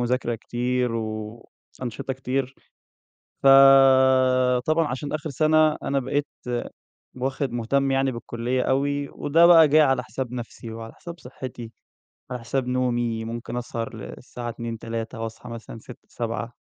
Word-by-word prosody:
مذاكرة 120 Hz, 0 st, 0 dB
كتير 125 Hz, +1 st, -1 dB
وأنشطة 115 Hz, +4 st, -6 dB
كتير. 130 Hz, +1 st, -3 dB, 0.9 s
فطبعًا 130 Hz, +1 st, +5 dB
عشان 140 Hz, +2 st, -4 dB
آخِر 155 Hz, 0 st, -3 dB
سَنة، 155 Hz, +2 st, +3 dB
أنا 140 Hz, 0 st, 0 dB
بقيت 145 Hz, +2 st, -1 dB, 0.9 s
واخِد 135 Hz, +1 st, -2 dB
مُهتم 135 Hz, +4 st, 0 dB
يعني 135 Hz, 0 st, +1 dB
بالكُلّية 120 Hz, +1 st, -2 dB
أوي 140 Hz, +1 st, 0 dB
وده 165 Hz, +4 st, +3 dB
بقى 165 Hz, -3 st, +8 dB
جِه 155 Hz, +2 st, +6 dB
على 135 Hz, -2 st, +2 dB
حساب 125 Hz, +2 st, -5 dB
نفسي 120 Hz, -1 st, -7 dB
وعلى 115 Hz, 0 st, -8 dB
حساب 170 Hz, 0 st, -10 dB
صحّتي، 125 Hz, -2 st, -8 dB, 0.6 s
على 125 Hz, -1 st, -4 dB
حساب 125 Hz, +2 st, -2 dB
نومي، 120 Hz, -3 st, 0 dB
ممكن 115 Hz, +1 st, -5 dB
أسهر 115 Hz, -2 st, -4 dB
للساعة 120 Hz, +2 st, -8 dB
02:00، 115 Hz, 0 st, -6 dB
03:00 115 Hz, +1 st, -5 dB
وأصحى 115 Hz, +1 st, -7 dB
مثلًا 115 Hz, -1 st, -8 dB
06:00، 120 Hz, +2 st, -14 dB
07:00 115 Hz, 0 st, -4 dB
125 Hz, 130 wpm, -24 LUFS, 115-135 Hz, 0.9 s, بقى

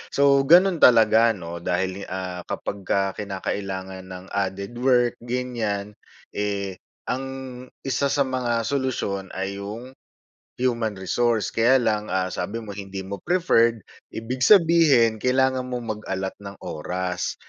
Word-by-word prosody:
So 140 Hz, -1 st, +5 dB
gano'n 175 Hz, 0 st, +6 dB
talaga 115 Hz, -1 st, +6 dB
'no, 85 Hz, -2 st, -7 dB
dahil, 95 Hz, +2 st, -1 dB
ah, 90 Hz, -1 st, -5 dB
kapagka 100 Hz, -1 st, -2 dB
kinakailangan 95 Hz, -1 st, -4 dB
ng 90 Hz, 0 st, -9 dB
added 100 Hz, +3 st, -2 dB
work 125 Hz, -2 st, +3 dB
ganiyan, 120 Hz, -5 st, -2 dB, 0.4 s
eh, 100 Hz, -2 st, -2 dB, 0.3 s
ang 130 Hz, +2 st, -2 dB, 0.6 s
1 135 Hz, +2 st, +1 dB
sa 140 Hz, -, +3 dB
mga 120 Hz, -3 st, -1 dB
solusyon 115 Hz, -8 st, -2 dB
ay 95 Hz, +1 st, -3 dB
yung, 110 Hz, +6 st, -7 dB, 0.6 s
human 120 Hz, -4 st, 0 dB
resource, 110 Hz, +3 st, 0 dB
kaya 125 Hz, +3 st, +3 dB
lang, 105 Hz, -2 st, 0 dB
ah, 95 Hz, 0 st, -1 dB
sabi 115 Hz, +5 st, -4 dB
mo 105 Hz, -, -9 dB
hindi 100 Hz, -1 st, -6 dB
mo 100 Hz, +1 st, -6 dB
preferred, 115 Hz, -, +2 dB, 0.3 s
ibig 115 Hz, +3 st, -4 dB
sabihin 155 Hz, -, +5 dB
kailangan 130 Hz, +1 st, +1 dB
mong 120 Hz, -4 st, -4 dB
mag-allot 95 Hz, 0 st, -2 dB
ng 100 Hz, -1 st, -9 dB
oras. 90 Hz, +3 st, -3 dB
110 Hz, 125 wpm, -24 LUFS, 95-125 Hz, 0.6 s, gano'n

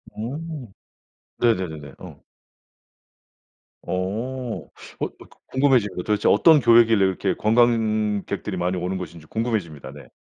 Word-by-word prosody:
오. 135 Hz, 0 st, -6 dB, 0.7 s
네네네네. 90 Hz, -11 st, -1 dB
어. -, -, -12 dB, 1.6 s
어. 115 Hz, +7 st, -3 dB
어 -, -, -27 dB, 0.3 s
그 -, -, -1 dB, 0.4 s
궁금해집니다. 125 Hz, -9 st, +2 dB
도대체 105 Hz, -1 st, +1 dB
어떤 155 Hz, +8 st, +6 dB
교회길래 115 Hz, -4 st, +5 dB
이렇게 95 Hz, -1 st, -1 dB
관광객들이 110 Hz, -4 st, +1 dB
많이 90 Hz, +1 st, -1 dB
오는 90 Hz, +2 st, -2 dB
것인지 85 Hz, -3 st, -8 dB
궁금해집니다. 95 Hz, -, -3 dB
네. 75 Hz, -, -13 dB
105 Hz, 270 characters per minute, -23 LUFS, 95-120 Hz, 1.6 s, 어떤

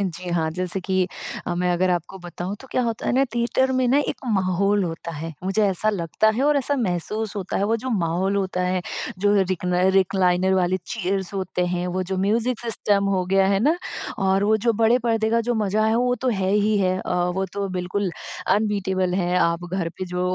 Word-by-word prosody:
जी 180 Hz, -2 st, -3 dB
हाँ, 160 Hz, -2 st, 0 dB
जैसे 180 Hz, +3 st, -2 dB
कि 185 Hz, 0 st, 0 dB, 0.4 s
अ, 175 Hz, -, -1 dB
मैं 180 Hz, 0 st, 0 dB
अगर 180 Hz, +1 st, +1 dB
आपको 175 Hz, +2 st, -2 dB
बताऊँ 175 Hz, +2 st, -6 dB
तो 265 Hz, -, -12 dB
क्या 255 Hz, -, +1 dB
होता 230 Hz, -1 st, -3 dB
है -, -, +1 dB
ना, 270 Hz, +2 st, +3 dB
थिएटर 250 Hz, +2 st, +1 dB
में 255 Hz, -1 st, +2 dB
ना 275 Hz, +4 st, +4 dB
एक -, -, -2 dB, 0.2 s
माहौल 195 Hz, +1 st, +1 dB
होता 170 Hz, 0 st, -5 dB
है, 160 Hz, +2 st, -6 dB
मुझे 195 Hz, +3 st, +1 dB
ऐसा 200 Hz, +3 st, +3 dB
लगता 185 Hz, +2 st, +1 dB
है 255 Hz, -, 0 dB
और 295 Hz, 0 st, +3 dB
ऐसा 285 Hz, +1 st, +1 dB
महसूस 215 Hz, 0 st, -2 dB
होता 190 Hz, -2 st, -3 dB
है, 200 Hz, -, +1 dB
वो 225 Hz, +3 st, +1 dB
जो 255 Hz, +3 st, -5 dB
माहौल 180 Hz, +4 st, 0 dB
होता 190 Hz, -2 st, -1 dB
है, 185 Hz, 0 st, 0 dB, 0.4 s
जो 205 Hz, +1 st, +3 dB
रिक्न 180 Hz, -1 st, -1 dB
रिक्लाइनर 190 Hz, -1 st, +3 dB
वाली 185 Hz, 0 st, +2 dB
चेयर्स 195 Hz, -3 st, -2 dB
होते 185 Hz, -2 st, -1 dB
हैं, 180 Hz, 0 st, -2 dB
वो 180 Hz, +1 st, -1 dB
जो 190 Hz, +1 st, -3 dB
म्यूज़िक 225 Hz, +5 st, +1 dB
सिस्टम 210 Hz, -3 st, +1 dB
हो 185 Hz, -1 st, 0 dB
गया 195 Hz, 0 st, +3 dB
है 195 Hz, 0 st, +2 dB
ना? 305 Hz, +7 st, +3 dB, 0.4 s
और 195 Hz, 0 st, +2 dB
वो 220 Hz, +1 st, +4 dB
जो 235 Hz, -, +3 dB
बड़े 230 Hz, +3 st, +3 dB
पर्दे 225 Hz, -2 st, 0 dB
का 230 Hz, 0 st, +3 dB
जो 240 Hz, +1 st, -1 dB
मज़ा 215 Hz, 0 st, +1 dB
है, 220 Hz, -, +2 dB
वो 245 Hz, 0 st, +2 dB
तो 255 Hz, +2 st, -2 dB
है 190 Hz, -5 st, 0 dB
ही 210 Hz, +1 st, +2 dB
है। 185 Hz, -1 st, +1 dB
अ, -, -, -4 dB, 0.2 s
वो 190 Hz, -, 0 dB
तो 200 Hz, -1 st, -2 dB
बिल्कुल 185 Hz, +1 st, -2 dB, 0.4 s
अनबीटेबल 190 Hz, -3 st, +1 dB
है, 180 Hz, -1 st, 0 dB
आप 170 Hz, +1 st, +1 dB
घर 185 Hz, -3 st, -1 dB
पे 185 Hz, -, -2 dB
जो 180 Hz, 0 st, -4 dB
195 Hz, 220 wpm, -23 LUFS, 180-220 Hz, 0.4 s, ना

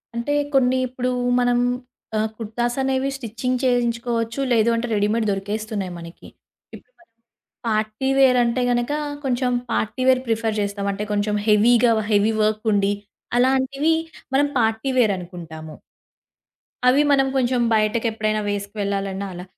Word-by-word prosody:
అంటే 235 Hz, +5 st, -1 dB, 0.2 s
కొన్ని 260 Hz, -1 st, +3 dB
ఇప్పుడు 255 Hz, 0 st, -2 dB, 0.3 s
మనం 245 Hz, 0 st, +2 dB, 0.6 s
ఆహ్, 215 Hz, -, +1 dB
కుర్తాస్ 240 Hz, +2 st, -2 dB
అనేవి 265 Hz, 0 st, 0 dB
స్టిచింగ్ 250 Hz, +1 st, -3 dB
చేయించుకోవచ్చు. 235 Hz, -1 st, 0 dB
లేదు 230 Hz, -1 st, +4 dB
అంటే, 230 Hz, +1 st, -2 dB
రెడీమేడ్ 210 Hz, +2 st, +1 dB
దొరికేస్తున్నాయి 205 Hz, -1 st, -3 dB
మనకి. 170 Hz, 0 st, -11 dB, 0.5 s
ఇపుడు -, -, -17 dB
మనం 340 Hz, -, -27 dB, 0.6 s
పార్టీ‌వేర్ 250 Hz, +5 st, +2 dB
అంటే 235 Hz, +2 st, 0 dB
గనక, 240 Hz, +3 st, 0 dB, 0.3 s
కొంచెం 250 Hz, -1 st, 0 dB, 0.2 s
పార్టీ‌వేర్ 255 Hz, +3 st, +1 dB
ప్రిఫర్ 225 Hz, -1 st, 0 dB
జేస్తాం. 200 Hz, 0 st, -2 dB
అంటే 205 Hz, +2 st, -4 dB
కొంచెం 210 Hz, 0 st, 0 dB
హెవీ‌గా, 230 Hz, +3 st, +5 dB, 0.2 s
హెవీ‌వర్క్ 215 Hz, +1 st, +2 dB
ఉండి. 200 Hz, 0 st, +2 dB, 0.4 s
అలాంటివి 265 Hz, +5 st, +2 dB, 0.4 s
మనం 285 Hz, +1 st, +3 dB
పార్టీ‌వేర్ 225 Hz, 0 st, +2 dB
అనుకుంటాము. 165 Hz, -3 st, -9 dB, 1.1 s
అవి 265 Hz, +3 st, +5 dB
మనం 270 Hz, -1 st, +4 dB
కొంచెం 250 Hz, -1 st, +1 dB
బయటకెప్పుడైనా 215 Hz, 0 st, 0 dB
వేసుకు 205 Hz, +1 st, -4 dB
వెళ్ళాలన్న 195 Hz, -1 st, -2 dB
అలా. 175 Hz, +1 st, -7 dB
230 Hz, 120 wpm, -22 LUFS, 210-250 Hz, 1.1 s, హెవీ‌గా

